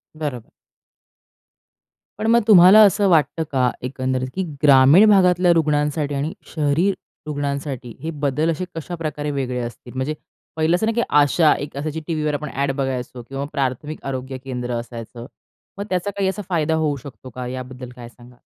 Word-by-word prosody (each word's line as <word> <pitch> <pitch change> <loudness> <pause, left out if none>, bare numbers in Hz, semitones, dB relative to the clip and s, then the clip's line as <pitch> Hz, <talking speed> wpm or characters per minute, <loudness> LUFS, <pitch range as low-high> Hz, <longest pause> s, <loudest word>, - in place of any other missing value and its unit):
बरोबर. 145 -7 -5 1.7
पण 220 - -1
मग 235 0 +5
तुम्हाला 195 0 +8
असं 200 0 +4
वाटतं 165 -1 +2
का 130 -3 +2
एकंदरीत 130 0 -2
की 190 - -1 0.2
ग्रामीण 140 +7 +7
भागातल्या 180 -3 +4
रुग्णांसाठी 150 -2 0
आणि 145 +4 -2 0.2
शहरी 155 +4 +2 0.4
रुग्णांसाठी 140 -4 -4
हे 165 - -3
बदल 150 +3 +1
असे 165 +3 -3
कशाप्रकारे 155 -3 -4
वेगळे 130 -3 -2
असतील? 120 0 -7
म्हणजे 130 +4 -2 0.4
पहिलं 160 +2 +2
असं 180 - 0
ना 225 - +1
की 235 - +2
आशा 150 +2 +4
एक 145 -1 -7
असायची 155 +2 -3
टीव्हीवर 155 -2 -1
आपण 150 0 -3
ॲड 140 0 0
बघायचो 130 -2 -3
किंवा 135 +1 -4
प्राथमिक 140 +2 -3
आरोग्य 130 -1 -4
केंद्र 125 -2 -4
असायचं. 115 0 -9 0.5
मग 200 - -4
त्याचा 185 +2 -1
काही 195 -1 +1
असा 190 +2 -4
फायदा 160 -3 +1
होऊ 155 -2 0
शकतो 130 -1 -11
का? 125 +1 -6
याबद्दल 130 0 -7
काय 120 -2 -10
सांगाल? 120 +1 -18
145 Hz, 160 wpm, -21 LUFS, 130-160 Hz, 1.7 s, तुम्हाला